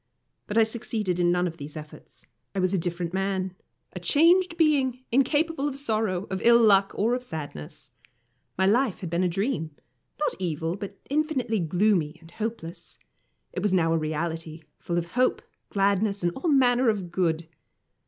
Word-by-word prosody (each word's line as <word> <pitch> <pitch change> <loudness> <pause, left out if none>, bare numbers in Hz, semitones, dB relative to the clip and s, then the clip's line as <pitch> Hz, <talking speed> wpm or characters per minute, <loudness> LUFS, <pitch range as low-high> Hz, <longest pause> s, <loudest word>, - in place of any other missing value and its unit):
But 210 - -2
I 225 - +7
succeeded 220 -5 -1
in 175 0 +3
none 180 0 +2
of 165 -2 -4
these 150 +1 -8
efforts. 150 0 -11 0.3
I - - 0
was 185 +1 +1
a - - +3
different 175 0 -3
man, 190 -1 -1 0.4
a - - -5
changed 340 +3 +4
being, 270 -6 +2
incapable 290 +4 +2
of 275 -2 -4
sorrow, 215 -8 -1
of 190 - -2
ill 235 0 +7
luck, 200 -4 +5
or 225 +4 +1
of 250 0 -2
sadness. 145 - -7 0.7
My 190 - +3
life 230 +2 +2
had 175 -4 -5
been 175 +2 +1
a - - +3
dream, 180 - -2 0.4
not 300 - +1
evil, 165 -1 -2
but 200 0 -7
infinitely 280 -7 0
gloomy 175 -2 +1
and 165 0 -16
hopeless. 215 -5 -5 0.6
It 185 - -3
was 200 -1 +1
now 165 -3 +3
a - - +3
reality, 160 +1 -3 0.2
full 175 - -2
of 170 -1 -2
hope, 255 +4 +1 0.3
gladness, 200 0 +1
and 175 - +2
all 330 +5 -1
manner 250 -3 +4
of 195 -5 -2
good. 165 -2 0
195 Hz, 175 wpm, -26 LUFS, 170-240 Hz, 0.7 s, I